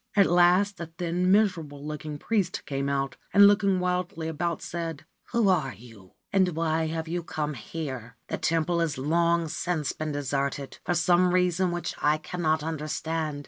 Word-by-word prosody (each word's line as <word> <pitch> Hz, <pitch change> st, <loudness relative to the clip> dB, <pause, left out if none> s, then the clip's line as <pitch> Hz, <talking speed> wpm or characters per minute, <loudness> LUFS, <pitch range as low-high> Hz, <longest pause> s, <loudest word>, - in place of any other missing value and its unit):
At 200 Hz, -2 st, +6 dB
last 180 Hz, +4 st, +4 dB
a 170 Hz, -, -5 dB
thin, 175 Hz, +2 st, -1 dB
miserable 165 Hz, -9 st, +1 dB
looking 150 Hz, 0 st, -5 dB
priest 195 Hz, +1 st, -1 dB
came 140 Hz, 0 st, -2 dB
out, 135 Hz, -1 st, -1 dB, 0.2 s
and, 200 Hz, 0 st, +9 dB
looking 200 Hz, -2 st, +3 dB
wildly 180 Hz, -3 st, -2 dB
about, 170 Hz, +1 st, -2 dB
said: 165 Hz, -3 st, -5 dB
' -, -, -51 dB
Who 235 Hz, -3 st, +3 dB
are 155 Hz, -, +1 dB
you, 105 Hz, -4 st, -16 dB, 0.2 s
and 185 Hz, -4 st, +3 dB
why 160 Hz, 0 st, 0 dB
have 160 Hz, 0 st, -3 dB
you 175 Hz, +2 st, -2 dB
come 155 Hz, -2 st, -3 dB
here? 130 Hz, -2 st, -6 dB
The -, -, -3 dB
temple 165 Hz, +1 st, +1 dB
has 160 Hz, -3 st, 0 dB
long 170 Hz, +4 st, +2 dB
since 155 Hz, -1 st, -2 dB
been 155 Hz, -1 st, -4 dB
deserted, 140 Hz, -1 st, -2 dB
for 175 Hz, -, 0 dB
some 180 Hz, +1 st, +3 dB
reason 180 Hz, 0 st, +2 dB
which 175 Hz, 0 st, -3 dB
I 150 Hz, +1 st, +3 dB
cannot 155 Hz, -1 st, -1 dB
understand. 155 Hz, -1 st, -3 dB
165 Hz, 170 wpm, -27 LUFS, 150-180 Hz, 0.2 s, and